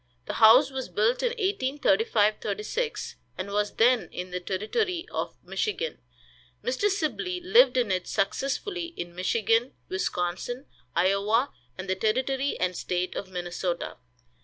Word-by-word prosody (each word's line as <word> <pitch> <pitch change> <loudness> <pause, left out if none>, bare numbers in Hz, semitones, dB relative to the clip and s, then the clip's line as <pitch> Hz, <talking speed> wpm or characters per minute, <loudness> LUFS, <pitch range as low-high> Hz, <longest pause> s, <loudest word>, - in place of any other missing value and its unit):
The - - -4
house 250 +6 +8
was 265 -1 -4
built 225 +4 +2
in - - +2
1835 260 - +2
36, 215 - -3 0.2
and 185 +2 -4
was 210 0 0
then 240 +1 +4
in 180 0 -6
the 180 - -2
Territory 330 - -1
of - - -3
Michigan. 435 +3 -2 0.6
Mr. 260 +12 +1
Sibley 360 - -1
lived 360 - +5
in 235 -5 +2
it 185 -1 -1
successively 335 - -2
in 175 0 -5
Michigan, 225 +6 +1 0.2
Wisconsin, 190 +7 -2 0.3
Iowa, 200 +8 +2 0.2
and 185 - -6
the 190 - +2
Territory 260 +7 0
and 180 0 0
State 180 +1 -2
of 195 - -4
Minnesota. 175 -1 -3
225 Hz, 135 wpm, -27 LUFS, 190-295 Hz, 0.6 s, house